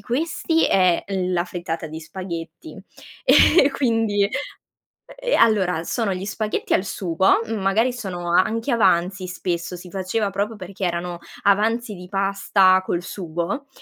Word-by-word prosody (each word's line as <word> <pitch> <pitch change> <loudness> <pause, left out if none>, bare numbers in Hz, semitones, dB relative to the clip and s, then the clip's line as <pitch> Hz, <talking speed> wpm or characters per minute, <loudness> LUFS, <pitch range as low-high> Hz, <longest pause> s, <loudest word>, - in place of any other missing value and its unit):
questi 320 +7 0
è 185 -3 +3
l 185 -2 -2
la 175 0 +1
frittata 170 -2 -5
di 160 +1 -8
spaghetti 180 - -8 0.4
e - - +5 0.3
e - - +1
quindi 225 -6 +1 0.7
ehm, - - -3
allora 190 -7 +3
sono 225 -5 -1
gli 185 +1 -5
spaghetti 210 +2 -2
al 185 - +2
sugo, 190 -1 +1
mhmm, 225 0 -3
magari 220 +6 +2
sono 180 -7 -5
anche 225 +8 +2
avanzi 185 -4 +2
spesso, 175 -1 -3
si 180 +1 -11
faceva 195 +3 -2
proprio 205 +3 -2
perché 190 +1 -8
erano 175 0 -3 0.3
avanzi 215 +2 +2
di 180 0 -10
pasta 195 -1 +3
col 175 - -1
sugo, 175 - -4
195 Hz, 145 wpm, -22 LUFS, 180-220 Hz, 0.7 s, e